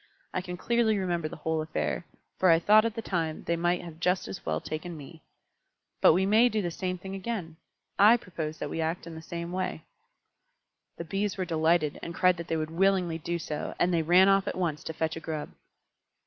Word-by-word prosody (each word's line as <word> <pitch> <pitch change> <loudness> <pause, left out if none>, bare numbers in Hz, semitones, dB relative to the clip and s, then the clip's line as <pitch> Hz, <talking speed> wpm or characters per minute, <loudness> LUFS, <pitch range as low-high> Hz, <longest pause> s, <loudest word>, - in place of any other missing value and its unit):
I 185 - -1
can 180 -1 -6
clearly 230 +1 +2
remember 175 -4 -1
the - - -8
whole 160 +1 -1
affair, 155 +2 -3 0.3
for 185 - +4
I 165 - +7
thought 210 +6 +5
at 230 -1 -2
the 225 - -4
time 165 -6 -1
that - - -13
they 170 - +1
might 175 -1 -1
just 180 +2 +1
as 95 - -7
well 80 - -1
have - - -8
taken 160 +2 -5
me. 155 +3 -11 0.8
But - - +7
we 190 +3 +2
may 220 +5 +5
do 220 - -1
the 175 -4 -2
same 185 +1 -3
thing 190 +2 -8
again. 190 -5 -4 0.4
I 215 +4 +8
propose 160 -7 -5
that - - -5
we 165 - -2
act 165 +2 -2
in 170 - -8
the 160 - -8
same 170 +1 -6
way." 185 -3 -3 1.1
The 170 - -5
Bees 195 +4 -2
were 185 - -1
delighted, 160 -2 +1
and 170 - -6
cried 180 -1 +4
that 170 0 -6
they 165 - 0
would 155 0 -3
willingly 180 -2 +2
do 170 +2 -2
so, 155 -2 -5
and 180 +1 +2
they 165 - +3
ran 180 +4 +5
off 195 0 +3
at - - -3
once 165 -5 -1
to 160 - -4
fetch 160 0 -2
a - - -5
Grub. 155 -2 -5
170 Hz, 225 wpm, -28 LUFS, 160-190 Hz, 1.1 s, I